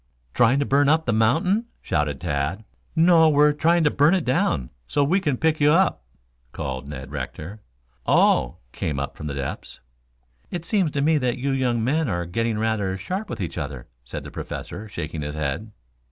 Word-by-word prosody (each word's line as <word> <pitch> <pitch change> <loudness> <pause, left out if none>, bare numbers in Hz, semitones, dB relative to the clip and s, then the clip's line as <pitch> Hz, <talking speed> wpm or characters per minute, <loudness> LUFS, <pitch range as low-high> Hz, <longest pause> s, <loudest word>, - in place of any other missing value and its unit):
"Trying 120 +2 +4
to 145 - +1
burn 140 +1 +3
up 160 +1 +3
the 115 - +1
mountain?" 160 - +2
shouted 75 -5 -1
Tad. 75 +9 -2 0.3
"No; 165 -1 +6
we're 150 0 +5
trying 165 +3 +3
to 150 - +3
burn 150 +6 +4
it 180 - -1
down, 80 - 0 0.2
so 145 - +1
we 175 +8 +2
can 150 -8 -1
pick 160 +1 +1
you 145 0 +5
up," 185 +4 +3 0.5
called 65 0 -5
Ned 70 -2 -7
Rector. 100 +8 -6 0.5
"Oh," 60 - +3
came 75 -4 -3
up 70 - -4
from 75 - -6
the 70 - -4
depths. 70 -1 -5 0.7
"It 175 -2 -5
seems 190 -3 +1
to 140 - 0
me 155 0 +3
that 125 -1 0
you 135 +2 -1
young 125 -4 0
men 145 +3 +1
are 85 -3 -1
getting 115 +5 -1
rather 105 -4 -1
sharp 190 - -4
with - - -5
each 85 -4 -4
other," 70 -4 -6
said - - -7
the - - -9
Professor, 110 - -6
shaking 80 -5 -5
his 75 +1 -4
head. 75 +9 -3
120 Hz, 190 wpm, -23 LUFS, -, 0.7 s, No